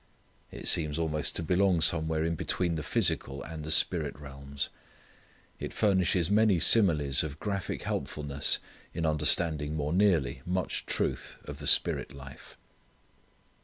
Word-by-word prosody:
It -, -, -7 dB
seems 75 Hz, -3 st, +3 dB
almost 75 Hz, -2 st, -2 dB
to 85 Hz, -, -3 dB
belong 90 Hz, +1 st, +2 dB
somewhere 80 Hz, -1 st, +1 dB
in 85 Hz, -, -1 dB
between 90 Hz, 0 st, -2 dB
the 80 Hz, -, -3 dB
physical 70 Hz, -1 st, -1 dB
and 80 Hz, -1 st, -6 dB
spirit 75 Hz, -, +2 dB
realms. 70 Hz, -1 st, -6 dB, 0.9 s
It -, -, -6 dB
furnishes 95 Hz, -3 st, +1 dB
many 105 Hz, -3 st, +3 dB
similes 75 Hz, -9 st, +5 dB
of 75 Hz, -1 st, -7 dB
graphic 100 Hz, -3 st, -4 dB
helpfulness 70 Hz, -1 st, 0 dB, 0.4 s
in 85 Hz, -1 st, -2 dB
understanding 75 Hz, 0 st, 0 dB
more 75 Hz, +1 st, -2 dB
nearly 85 Hz, -10 st, +1 dB
much 90 Hz, 0 st, -3 dB
truth -, -, -2 dB
of 75 Hz, 0 st, -8 dB
the 75 Hz, -, -6 dB
Spirit -, -, +2 dB
life. 65 Hz, 0 st, -13 dB
80 Hz, 130 wpm, -29 LUFS, 75-90 Hz, 0.9 s, similes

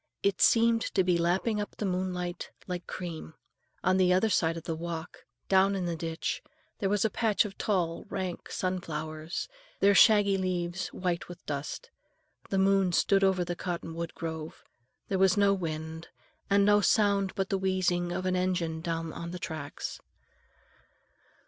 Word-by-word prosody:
It 200 Hz, -2 st, +1 dB
seemed 230 Hz, 0 st, +5 dB
to 190 Hz, -, +4 dB
be 180 Hz, -1 st, +2 dB
lapping 190 Hz, +6 st, +1 dB
up 205 Hz, -, -6 dB
the 210 Hz, -, -3 dB
moonlight 180 Hz, -1 st, -2 dB, 0.2 s
like 180 Hz, -1 st, -5 dB
cream. 165 Hz, -3 st, -6 dB, 0.5 s
On 185 Hz, +1 st, +3 dB
the 185 Hz, -1 st, +4 dB
other 185 Hz, +5 st, +3 dB
side 165 Hz, -2 st, +2 dB
of 165 Hz, -, -7 dB
the 165 Hz, -, -3 dB
walk, 165 Hz, 0 st, -6 dB, 0.2 s
down 195 Hz, +1 st, +4 dB
in 185 Hz, -2 st, -2 dB
the 170 Hz, -1 st, -1 dB
ditch, 165 Hz, 0 st, -3 dB, 0.4 s
there 195 Hz, -, 0 dB
was 205 Hz, +1 st, +2 dB
a -, -, +3 dB
patch 220 Hz, -1 st, +2 dB
of 195 Hz, -2 st, -6 dB
tall, 175 Hz, -5 st, -1 dB
rank 185 Hz, -2 st, -4 dB
sunflowers, 160 Hz, -3 st, -3 dB, 0.3 s
their 200 Hz, +1 st, +5 dB
shaggy 200 Hz, -2 st, +6 dB
leaves 180 Hz, -1 st, -2 dB
white 180 Hz, -2 st, -3 dB
with 175 Hz, -, -11 dB
dust. 150 Hz, -, -5 dB, 0.6 s
The 195 Hz, -, 0 dB
moon 195 Hz, -1 st, +3 dB
stood 195 Hz, +3 st, +3 dB
over 190 Hz, -2 st, +3 dB
the 175 Hz, 0 st, -3 dB
cottonwood 170 Hz, -2 st, -4 dB
grove. 160 Hz, -1 st, -6 dB, 0.4 s
There 190 Hz, -, -1 dB
was 190 Hz, 0 st, +4 dB
no 200 Hz, -1 st, +5 dB
wind, 160 Hz, -2 st, -4 dB, 0.4 s
and 200 Hz, 0 st, +4 dB
no 205 Hz, 0 st, +5 dB
sound 200 Hz, -2 st, +2 dB
but 195 Hz, -2 st, -1 dB
the 195 Hz, -, 0 dB
wheezing 180 Hz, -2 st, +1 dB
of 185 Hz, +1 st, -3 dB
an 185 Hz, 0 st, +1 dB
engine 175 Hz, -3 st, -1 dB
down 165 Hz, -1 st, -3 dB
on 170 Hz, -, -6 dB
the 180 Hz, -, -5 dB
tracks. 155 Hz, -4 st, -5 dB
180 Hz, 165 wpm, -29 LUFS, 170-195 Hz, 0.6 s, shaggy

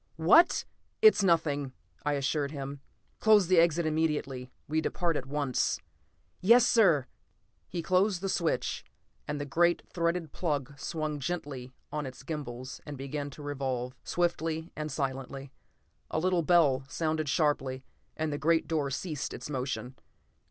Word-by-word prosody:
"What 245 Hz, -, +5 dB, 0.2 s
" -, -, -44 dB
"It's 435 Hz, -, +8 dB
nothing," 150 Hz, -6 st, +2 dB, 0.3 s
I 145 Hz, -, +1 dB
assured 140 Hz, +1 st, 0 dB
him. 140 Hz, -1 st, -6 dB, 0.4 s
"Close 215 Hz, -3 st, +6 dB
the 180 Hz, 0 st, +5 dB
exit 170 Hz, 0 st, +3 dB
immediately; 150 Hz, -5 st, -1 dB, 0.2 s
we 155 Hz, +1 st, +1 dB
depart 170 Hz, 0 st, 0 dB
at 135 Hz, -, -3 dB
once." 140 Hz, -2 st, 0 dB, 0.6 s
"Yes, 235 Hz, +5 st, +7 dB
sir!" 175 Hz, -, +4 dB, 0.6 s
He 170 Hz, -1 st, -3 dB
closed 185 Hz, +2 st, +2 dB
the 195 Hz, -, -3 dB
switch, 170 Hz, -3 st, -1 dB, 0.4 s
and 145 Hz, 0 st, -3 dB
the 145 Hz, -, -3 dB
great 170 Hz, +5 st, +2 dB
threaded 170 Hz, -2 st, -1 dB
plug 145 Hz, -5 st, -2 dB
swung 155 Hz, -2 st, -3 dB
gently 140 Hz, -5 st, -4 dB, 0.2 s
on 150 Hz, -2 st, -3 dB
its 130 Hz, +1 st, -10 dB
gimbals 130 Hz, -4 st, -6 dB
and 145 Hz, -2 st, -7 dB
began 140 Hz, +2 st, -4 dB
to 145 Hz, +1 st, -11 dB
revolve, 130 Hz, -3 st, -3 dB
swiftly 165 Hz, -2 st, -1 dB
and 155 Hz, 0 st, -4 dB
silently. 135 Hz, -1 st, -4 dB, 0.6 s
A -, -, -2 dB
little 180 Hz, +1 st, +2 dB
bell 150 Hz, -6 st, +4 dB
sounded 155 Hz, -1 st, -1 dB
sharply, 135 Hz, -5 st, 0 dB, 0.3 s
and 155 Hz, -1 st, -1 dB
the 145 Hz, -, -3 dB
great 165 Hz, +2 st, +2 dB
door 150 Hz, -4 st, 0 dB
ceased 150 Hz, +2 st, -3 dB
its -, -, -7 dB
motion. 130 Hz, -1 st, -3 dB
150 Hz, 145 wpm, -30 LUFS, 135-170 Hz, 0.6 s, It's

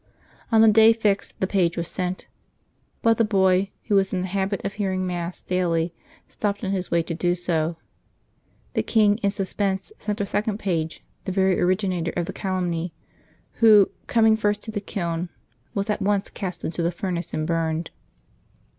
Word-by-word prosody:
On 220 Hz, -1 st, +6 dB
the 225 Hz, -, +7 dB
day 220 Hz, +1 st, +7 dB
fixed 210 Hz, -3 st, -1 dB
the -, -, +3 dB
page 180 Hz, -3 st, +1 dB
was 170 Hz, -1 st, -2 dB
sent; 180 Hz, 0 st, -3 dB, 0.8 s
but 230 Hz, 0 st, +4 dB
the -, -, +5 dB
boy, 190 Hz, -2 st, +3 dB
who 215 Hz, -, -2 dB
was 195 Hz, -1 st, +3 dB
in 185 Hz, -, 0 dB
the 185 Hz, -, -2 dB
habit 195 Hz, +1 st, -1 dB
of 200 Hz, -, -2 dB
hearing 190 Hz, -3 st, -1 dB
Mass 175 Hz, -1 st, -4 dB
daily, 170 Hz, -2 st, 0 dB, 0.3 s
stopped 205 Hz, 0 st, -3 dB
on 190 Hz, -, -1 dB
his 185 Hz, -2 st, -2 dB
way 170 Hz, -1 st, +2 dB
to 165 Hz, -, -4 dB
do 175 Hz, +1 st, +1 dB
so. 170 Hz, -2 st, -1 dB, 1.0 s
The -, -, +1 dB
king, 210 Hz, -1 st, +3 dB
in 200 Hz, -3 st, +1 dB
suspense, 195 Hz, -, -2 dB
sent 210 Hz, +1 st, -3 dB
a 200 Hz, -, 0 dB
second 205 Hz, +1 st, -1 dB
page, 165 Hz, -6 st, -2 dB, 0.2 s
the 190 Hz, -, -2 dB
very 190 Hz, -1 st, +2 dB
originator 180 Hz, -2 st, 0 dB
of 175 Hz, -, 0 dB
the 190 Hz, -, -6 dB
calumny, 175 Hz, -3 st, -2 dB, 0.7 s
who, 215 Hz, -3 st, +7 dB, 0.2 s
coming 225 Hz, -2 st, +4 dB
first 210 Hz, -1 st, 0 dB
to 220 Hz, -, -5 dB
the 205 Hz, -2 st, -3 dB
kiln, 175 Hz, -4 st, -3 dB, 0.5 s
was 200 Hz, -1 st, -1 dB
at 210 Hz, -, -1 dB
once 200 Hz, 0 st, 0 dB
cast 185 Hz, -3 st, -5 dB
into 170 Hz, +1 st, -3 dB
the 170 Hz, +1 st, +1 dB
furnace 175 Hz, 0 st, -3 dB
and 155 Hz, -, -2 dB
burned. 165 Hz, 0 st, -1 dB
190 Hz, 180 wpm, -24 LUFS, 175-205 Hz, 1.0 s, the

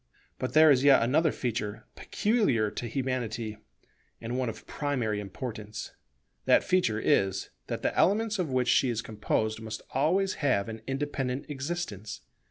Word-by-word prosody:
But 130 Hz, -, -3 dB
there 155 Hz, 0 st, +7 dB
is 130 Hz, -1 st, +4 dB
yet 140 Hz, -4 st, +6 dB
another 150 Hz, +6 st, +3 dB
feature 110 Hz, -4 st, -3 dB
peculiar 170 Hz, -, +1 dB
to 120 Hz, -, -5 dB
Humanity, 115 Hz, -4 st, -3 dB, 0.6 s
and 115 Hz, +2 st, -4 dB
one 130 Hz, -2 st, 0 dB
of 110 Hz, -, -9 dB
primary 125 Hz, -8 st, -1 dB
importance. 105 Hz, +1 st, -6 dB, 0.5 s
That -, -, +5 dB
feature 130 Hz, -13 st, +1 dB
is, 95 Hz, -3 st, +1 dB, 0.2 s
that -, -, -4 dB
the -, -, 0 dB
elements 210 Hz, +1 st, +2 dB
of 175 Hz, -5 st, 0 dB
which 130 Hz, -1 st, +1 dB
she 130 Hz, -, +4 dB
is 115 Hz, -1 st, -2 dB
composed 110 Hz, 0 st, -1 dB
must 110 Hz, -1 st, -6 dB
always 185 Hz, +8 st, +2 dB
have 125 Hz, -8 st, +2 dB
an 110 Hz, 0 st, -7 dB
independent 135 Hz, -1 st, -2 dB
existence. 135 Hz, -, -4 dB
125 Hz, 150 wpm, -29 LUFS, 110-145 Hz, 0.6 s, there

